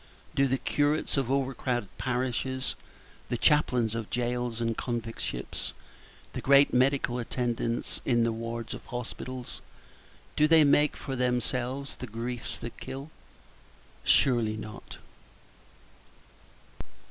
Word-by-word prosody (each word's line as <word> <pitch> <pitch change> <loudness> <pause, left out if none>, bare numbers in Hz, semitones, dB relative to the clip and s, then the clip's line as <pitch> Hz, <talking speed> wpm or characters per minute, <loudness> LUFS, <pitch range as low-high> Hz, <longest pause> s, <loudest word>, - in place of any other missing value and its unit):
Do 140 0 +3
the 130 0 +1
curates 145 +3 +1
of 135 -3 0
over 135 0 +1
crowded 120 -6 -2
parishes, 130 +1 -1 0.6
the 120 - 0
chaplains 125 -6 +3
of 115 -2 -3
jails 120 -1 -1
and 115 -1 0
convict 115 -2 -3
ships, - - -3 0.6
the - - -4
great 140 +1 +6
medical 130 -1 +3
attendants 120 -1 -1
in 120 -2 +3
the 115 - +2
wards 115 0 -4
of - - -9
hospitals 125 +1 -6 0.7
do 150 - +5
they 160 -1 +7
make 145 +1 +4
for 135 - -4
themselves 125 +2 -1
the 125 - -6
griefs 120 +2 -4
that 120 0 -7
kill? 135 +4 -7 0.9
Surely 115 -4 +4
not. 105 0 -8
125 Hz, 120 wpm, -29 LUFS, 115-135 Hz, 0.9 s, they